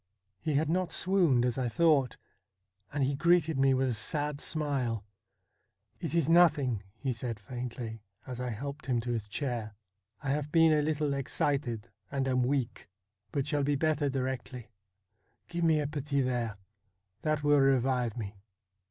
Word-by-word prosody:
He 155 - -1
had 150 +2 +2
not 180 +2 0
swooned, 175 -10 +3
as 125 +1 0
I 125 -2 0
thought, 150 -3 +3 0.7
and 145 -1 0
he 135 +2 +1
greeted 165 -1 +3
me 135 -1 +4
with 130 0 +1
a - - 0
sad 145 +6 -2
smile. 130 -9 -1 0.5
' - - -45
It - - -2
is 165 -4 +2
nothing,' 150 - +4 0.2
he 130 +2 -1
said 115 -2 -4
faintly, 120 -1 -6 0.2
as 125 -2 -6
I 125 - -2
helped 140 +6 -6
him 125 -3 +2
to 120 +1 -3
his 110 -3 -2
chair; 115 -2 -3 0.2
' 100 +2 -44
I 135 - 0
have 150 +1 -2
been 165 -1 +6
a 150 - +3
little 150 -1 0
excited, 135 -4 -1 0.2
and 135 -1 -1
am 130 -1 +2
weak, 125 -6 -1 0.4
but 140 -2 -1
shall 145 -1 0
be 145 +1 +2
better 150 0 +1
directly. 130 -3 -4 0.8
Give 170 0 -3
me 160 -2 +4
a 150 - 0
petit 145 -1 -1
verre. 120 -4 -1 0.6
That 155 -1 0
will 145 0 +5
revive 130 -3 +2
me.' 105 -3 -4
135 Hz, 170 wpm, -30 LUFS, 120-150 Hz, 0.8 s, been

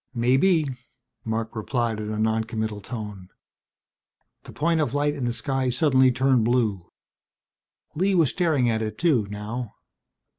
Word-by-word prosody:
"Maybe," 135 +8 +3 0.6
Marc 110 0 -3
replied 115 0 -1
in 105 0 -4
a 110 - -3
noncommittal 110 -1 -1
tone. 105 -4 -7 1.2
The - - -9
point 165 +1 +1
of 145 - -1
light 145 0 +1
in 140 -4 -3
the 120 - 0
sky 130 +3 -1
suddenly 130 -1 +4
turned 130 -1 +2
blue. 110 -6 0 1.0
Lee 190 +5 +1
was 165 -6 +3
staring 155 -8 +1
at 110 -1 0
it 110 -1 -4
too, 140 -12 +2
now. 105 +3 -6
120 Hz, 140 wpm, -24 LUFS, 110-140 Hz, 1.2 s, suddenly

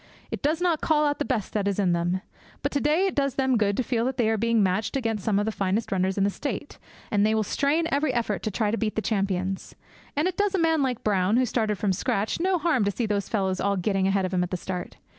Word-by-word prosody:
It - - -4
does 310 +3 +1
not 345 -3 +1
call 300 -1 +3
out 290 0 0
the 290 - 0
best 230 -7 -2
that 205 -2 0
is 200 - 0
in 190 -4 +2
them. 175 +2 0 0.4
But - - 0
to 285 - 0
day 310 +6 +3
it 385 - 0
does 275 -2 0
them 265 -1 +2
good 205 -3 +1
to 255 - +1
feel 235 -2 0
that 260 0 -2
they 230 -3 +2
are - - +2
being 230 -1 +3
matched 200 +7 0
against 225 -6 -2
some 210 -1 +1
of 205 - +1
the 220 - 0
finest 200 +2 -1
runners 190 0 0
in 195 - +2
the 200 - +2
State, 290 +4 -5 0.3
and 205 -1 +3
they 215 +1 +3
will 220 - +2
strain 285 - +1
every 285 0 +1
effort 230 -5 -1
to - - -2
try 210 0 0
to 230 - -1
beat 215 -2 -1
the 220 - -1
champions. 195 -3 -2 0.4
And 300 +5 +2
it 370 - -3
does 410 -1 +1
a - - +1
man 325 -2 +3
like 255 -4 -1
Brown, 200 +1 +2
who 255 - +3
started 220 -3 0
from 200 -2 +1
scratch, 200 - -1
no 370 +1 +2
harm 320 -9 +1
to - - +2
see 230 +4 -2
those 205 -2 -1
fellows 190 -3 0
all 200 0 +1
getting 190 +1 +1
ahead 195 -1 +1
of 185 - -4
him 180 - +2
at 180 - -1
the 180 - -2
start. 180 0 -6
220 Hz, 280 wpm, -26 LUFS, 195-275 Hz, 0.4 s, call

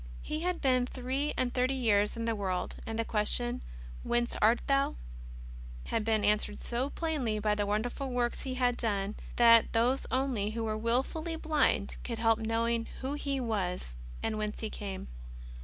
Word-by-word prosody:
He 305 - -3
had 360 +1 -1
been 255 -2 +3
three 265 +4 -2
and 245 -1 0
thirty 255 +1 +1
years 210 -4 +2
in 230 - -2
the 230 - +1
world, 190 -3 -2
and 225 0 -3
the 230 - 0
question: 240 +4 0 0.2
" - - -12
Whence 240 0 0
art 225 +3 +5
Thou? 275 0 +2 0.5
" - - -12
had 225 - +1
been 215 -1 +1
answered 210 0 +1
so 245 +3 -2
plainly 285 -10 -1
by 210 0 +1
the 205 -1 0
wonderful 240 +6 -1
works 245 -1 -1
He 260 -1 -3
had 245 -1 +2
done, 205 -3 -1 0.2
that 230 -1 +6
those 245 +4 +2
only 255 -6 0
who 225 +1 -3
were 215 -1 -1
wilfully 260 +9 -1
blind 300 -10 +1
could 235 -2 -3
help 225 0 +3
knowing 230 +1 0
who 265 +2 -2
He 280 -2 -2
was 190 - -2 0.3
and 215 -1 -1
whence 210 0 -3
He 220 - -3
came. 195 - -5
230 Hz, 180 wpm, -31 LUFS, 210-255 Hz, 0.5 s, that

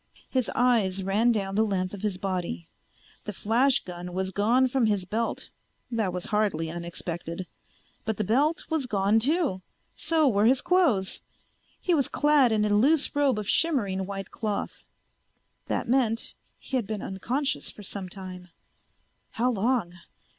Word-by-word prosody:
His 255 -3 +1
eyes 210 -7 +2
ran 210 +5 +3
down 195 -4 -1
the 215 +2 +3
length 185 -3 -1
of 200 - -7
his 205 -3 -1
body. 180 - -3 0.6
The 210 - -4
flash 240 +7 +2
gun 180 0 -7
was 190 +1 -2
gone 235 +7 +3
from 255 -2 +2
his 205 -4 0
belt. 225 +5 -2 0.4
That 220 -5 0
was 180 0 -4
hardly 180 -7 +1
unexpected. 170 +1 -5 0.6
But 220 -1 -2
the 215 - 0
belt 280 - +1
was 315 -5 -1
gone 205 0 +3
too. 285 - +1 0.3
So 320 -3 +2
were 210 -3 +3
his 260 +2 +4
clothes. 275 - +2 0.6
He 360 - +1
was 280 -6 +2
clad 295 -5 +4
in 210 -1 +2
a - - +1
loose 280 +10 +3
robe 285 -5 +3
of 210 -2 -4
shimmering 205 - +1
white 195 -1 -6
cloth. 215 -3 -4 0.8
That - - -1
meant 230 -3 +1 0.2
he 265 - -3
had 230 -6 -2
been 215 -2 -4
unconscious 255 +9 -2
for 210 - -11
some 195 -1 -5
time. 185 -1 -8 0.9
How 245 +3 +1
long? 225 -4 0
210 Hz, 155 wpm, -27 LUFS, 190-255 Hz, 0.9 s, his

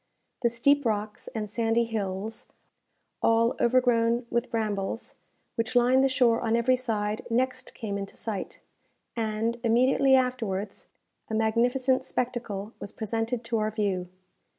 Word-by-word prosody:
The 240 - +3
steep 280 +5 +3
rocks 210 -2 -2
and 220 -4 -4
sandy 225 +2 +1
hills, 215 -1 -3 0.7
all 230 +1 +3
overgrown 240 -1 +3
with 235 +1 0
brambles, 215 -2 -2 0.4
which 230 +2 -2
line 250 +2 +5
the 270 - +4
shore 245 -3 +3
on 230 -1 +1
every 240 +2 +3
side 215 -4 -2
next 255 +2 -1
came 200 -3 -4
into 195 0 -7
sight; 210 -4 -5 0.5
and, 225 +1 -1
immediately 260 +3 +4
afterwards, 225 -6 -1 0.4
a 220 - -2
magnificent 245 +4 +2
spectacle 230 -4 -3
was 200 - -7
presented 225 +2 -2
to 230 -1 -1
our 215 0 +1
view. 200 -4 -1
230 Hz, 130 wpm, -27 LUFS, 215-245 Hz, 0.7 s, line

